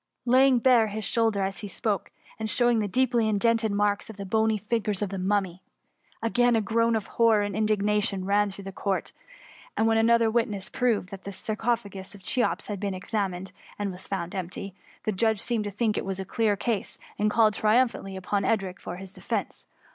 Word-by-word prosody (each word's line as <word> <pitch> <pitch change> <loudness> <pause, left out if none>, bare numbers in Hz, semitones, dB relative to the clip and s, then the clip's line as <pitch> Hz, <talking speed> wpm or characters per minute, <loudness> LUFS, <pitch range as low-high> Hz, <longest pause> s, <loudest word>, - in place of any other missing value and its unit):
^ - - -56 0.2
laying 260 +1 +5
bare 240 -2 +5
his 215 0 -4
shoulder 225 -4 +1
as 195 0 -2
he 205 - -6
spoke, 205 0 -2 0.3
and 220 0 -2
showing 240 0 +3
the 210 - 0
deeply 235 0 +2
indented 225 +1 +2
marks 205 +1 0
of 220 - -9
the 200 - -6
bony 220 +2 +2
fingers 210 -1 -1
of 200 - -3
the 195 - -3
Mummy, 190 -1 0 0.6
Again 245 +1 +3
a - - +4
groan 230 +2 +1
of 215 -3 -1
horror 225 -3 +3
and 205 - -3
indignation 210 -2 +1
ran 205 +1 +2
through 195 0 -9
the 195 - -6
Court; 195 0 -2 0.7
and 220 - +3
when 225 0 +3
another 230 0 +4
witness 210 -4 -1
proved 230 -7 0
that 195 -2 -9
the 200 - -6
sarcophagus 210 -2 -3
of 195 - -15
Cheops 245 +5 0
had 205 -2 -5
been 200 -1 -2
ex 185 - -10
amined, 190 -4 -2 0.3
and 205 -1 -2
was 180 +1 -8
found 180 -3 -3
empty, 190 +1 -5 0.3
the 215 - 0
judge 220 +2 +1
seemed 225 -2 -1
to - - -2
think 215 +1 0
it - - -4
was 195 0 -3
a 190 - -4
clear 215 +1 +1
case, 220 0 -2 0.2
and 210 +1 +3
called 215 -1 +4
triumphantly 215 -3 +1
upon 195 +2 -1
Edric 195 -5 0
for 175 - -6
his 190 +1 -9
defence. - - -4
210 Hz, 205 wpm, -27 LUFS, 195-225 Hz, 0.7 s, laying